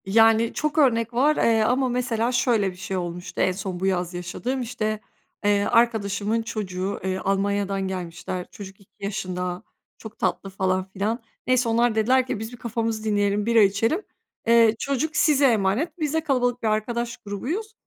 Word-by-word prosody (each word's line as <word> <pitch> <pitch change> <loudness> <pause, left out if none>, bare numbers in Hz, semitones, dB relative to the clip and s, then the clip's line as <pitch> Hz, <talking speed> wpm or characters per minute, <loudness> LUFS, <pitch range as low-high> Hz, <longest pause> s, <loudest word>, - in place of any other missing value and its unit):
Yani, 225 +3 +4
çok 305 0 -2
örnek 235 -5 +3
var, 285 +6 +3
eee, 225 -1 +3
ama 255 +3 +2
mesela, 240 -1 0
şöyle 235 -5 +2
bir - - -14
şey 185 +1 -4
olmuştu, 175 0 -4
en - - +3
son 185 -1 -5
bu 190 - -2
yaz 180 -2 0
yaşadığım. 190 +9 -3
İşte, 215 -3 -2 0.5
eee, 205 0 +3
arkadaşımın 220 -1 +1
çocuğu, 200 -4 -4
eee, 190 0 -1
Almanya'dan 195 0 0
gelmişler. 180 0 -5
Çocuk 195 -1 -10
2 195 - -24
yaşında, 180 -3 -3 0.3
çok 220 -1 -11
tatlı 180 +1 -1
falan 185 -1 0
filan. 215 +5 -1 0.3
Neyse, 255 -2 +3
onlar 230 0 +2
dediler 255 +4 +3
ki 240 - -2
"Biz 220 +2 -6
bir 245 - -10
kafamızı 225 -1 -2
dinleyelim, 205 -1 +1
bira 230 -1 +5
içelim. 215 - +2 0.5
Eee, 230 -1 +5
çocuk 280 +3 -1
size 290 -3 +4
emanet." 235 - +1
Biz 305 -2 -1
de 320 - +2
kalabalık 245 -4 0
bir - - +1
arkadaş 235 +2 -1
grubuyuz. 285 - -4
220 Hz, 170 wpm, -24 LUFS, 195-240 Hz, 0.5 s, bira